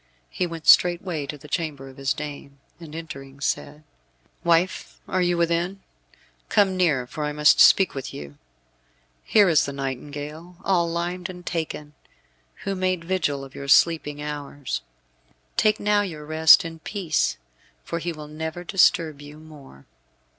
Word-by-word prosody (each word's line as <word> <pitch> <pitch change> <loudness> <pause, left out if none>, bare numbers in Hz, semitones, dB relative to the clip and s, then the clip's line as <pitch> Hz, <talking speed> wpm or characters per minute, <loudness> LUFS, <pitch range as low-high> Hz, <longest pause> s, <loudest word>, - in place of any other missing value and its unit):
He 180 - -1
went 165 -2 -8
straightway 175 -4 +4
to 150 - -6
the 150 +2 -14
chamber 150 -4 -3
of 130 - -13
his 135 0 -1
dame, 140 -2 -6 0.2
and 160 -2 -10
entering, 140 -4 -9
said, 150 +2 -3 0.6
"Wife, 170 +2 +1
are 185 - 0
you 175 -1 +1
within? 170 +3 0 0.7
Come 195 -2 +3
near, 155 -9 +2
for 150 +5 -6
I 150 - -1
must 150 0 +4
speak 190 -2 +6
with 135 -2 -6
you. 70 0 -10 0.8
Here 205 -2 +4
is 160 -4 +3
the 140 - -5
nightingale, 145 +5 -6
all 175 -4 +2
limed 175 +2 -3
and 180 -1 -10
taken, 155 -3 -4 0.7
who 195 - -2
made 185 -2 -1
vigil 160 -7 -1
of 135 0 -11
your 140 - -7
sleeping 150 -1 +3
hours. 145 -2 -5 0.7
Take 215 0 +3
now 210 0 +2
your 160 -7 -6
rest 160 +2 +6
in 165 -1 -7
peace, 160 - -1 0.5
for 170 - -4
he 170 +1 -3
will 155 -2 -9
never 160 +3 -6
disturb 165 -5 +2
you 145 +1 -11
more." 150 - -15
160 Hz, 155 wpm, -24 LUFS, 145-175 Hz, 0.8 s, speak